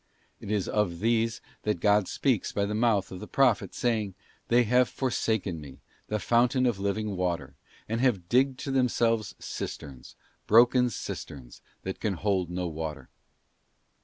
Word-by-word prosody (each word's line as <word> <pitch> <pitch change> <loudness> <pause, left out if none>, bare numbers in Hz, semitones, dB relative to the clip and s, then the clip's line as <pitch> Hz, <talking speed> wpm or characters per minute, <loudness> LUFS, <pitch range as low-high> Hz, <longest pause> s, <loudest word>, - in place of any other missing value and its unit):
It - - -9
is 105 -3 0
of 105 -5 0
these 115 +1 +1 0.2
that 105 -5 -1
God 105 0 +3
speaks 130 -8 0
by 100 - 0
the 105 - -3
mouth 105 -4 +1
of 90 - -7
the 105 - -8
Prophet, 130 -5 +2
saying, 110 -6 0 0.2
' - - -35
They 120 +1 +5
have 125 +2 +3
forsaken 110 - -1
Me, 70 -3 -11 0.3
the 105 - -1
fountain 120 +5 +2
of 120 -5 +1
living 100 +1 -1
water, 85 -6 -2 0.3
and 115 +2 -1
have 105 -10 +1
digged 130 +3 +3
to 140 - -3
themselves 115 -4 +1
cisterns, 65 -3 -7 0.3
broken 120 +3 +5
cisterns, 65 - -7 0.2
that 95 - -5
can 105 -3 -1
hold 95 -1 0
no 90 +1 -3
water. 80 -1 -5
105 Hz, 160 wpm, -28 LUFS, 95-120 Hz, 0.3 s, They